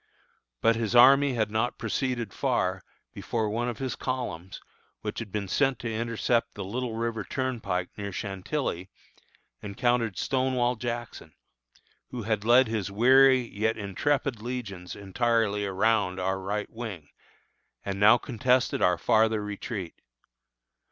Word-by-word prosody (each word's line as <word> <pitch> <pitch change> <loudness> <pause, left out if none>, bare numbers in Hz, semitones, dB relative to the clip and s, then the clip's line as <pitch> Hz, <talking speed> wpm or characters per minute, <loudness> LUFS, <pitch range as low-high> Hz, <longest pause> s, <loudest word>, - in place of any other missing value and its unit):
But 115 - +4
his 115 0 -2
army 135 +2 +7
had 110 -2 0
not 110 +3 -1
proceeded 125 -6 -2
far, - - 0 0.3
before 110 -3 -2
one 120 +3 -1
of 120 - -5
his 130 +1 -3
columns, 100 -9 -4 0.4
which 105 -1 -4
had 115 -4 -7
been 100 -1 -3
sent 135 +5 +1
to 115 -1 -4
intercept 115 +1 0
the 100 - -5
Little 115 +4 -4
River 115 -1 -2
Turnpike, 115 -8 -2
near 100 -1 -5
Chantilly, 95 - -3 0.7
encountered 115 +1 0
Stonewall 130 -2 +1
Jackson, 120 -9 -6 0.7
who 120 -3 -5
had 105 -1 -1
led 120 +3 +5
his 110 -3 -2
weary, 130 +5 +5
yet 110 -1 -2
intrepid 120 +4 -1
legions 110 -7 -6
entirely 105 0 0
around 100 -1 +1
our 95 +1 -1
right 105 +2 -3
wing, 105 -10 -7 0.8
and 100 0 -3
now 110 +4 +7
contested 125 0 +1
our 90 -1 +3
farther 110 +1 +2
retreat. 105 -3 -5
110 Hz, 130 wpm, -27 LUFS, 100-125 Hz, 0.8 s, army